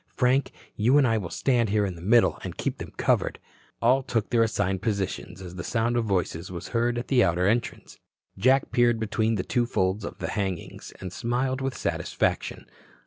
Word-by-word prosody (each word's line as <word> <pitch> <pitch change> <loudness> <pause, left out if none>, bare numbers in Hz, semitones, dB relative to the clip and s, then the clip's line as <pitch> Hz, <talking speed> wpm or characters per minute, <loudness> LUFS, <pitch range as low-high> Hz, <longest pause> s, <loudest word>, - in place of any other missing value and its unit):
Frank, 130 +2 +2 0.2
you 120 +7 +4
and 145 - +5
I 115 -1 +2
will 90 -5 -5
stand 120 -1 +1
here 105 0 +2
in 95 - -3
the 85 - -11
middle 110 +6 +4
and - - -6
keep - - -3
them - - -7
covered." - - +1 0.5
All 130 +3 +4
took 120 -5 -2
their 120 -1 +4
assigned 100 -4 0
positions 100 -3 -3
as 90 0 -9
the 85 - -4
sound 115 +3 0
of 120 -1 +1
voices 90 -3 -1
was 85 -2 -6
heard 120 +1 +1
at 120 - -4
the 125 -3 +4
outer 90 +1 +1
entrance. 115 +4 -1 0.4
Jack 130 +2 +3
peered 120 -2 +3
between 110 +1 0
the 90 - -1
two 120 -1 0
folds 95 -2 0
of - - -6
the - - -4
hangings 95 -4 -4
and 90 -1 -7
smiled 130 +4 -1
with 135 -1 -2
satisfaction. - - -1
115 Hz, 200 wpm, -26 LUFS, 95-120 Hz, 0.5 s, and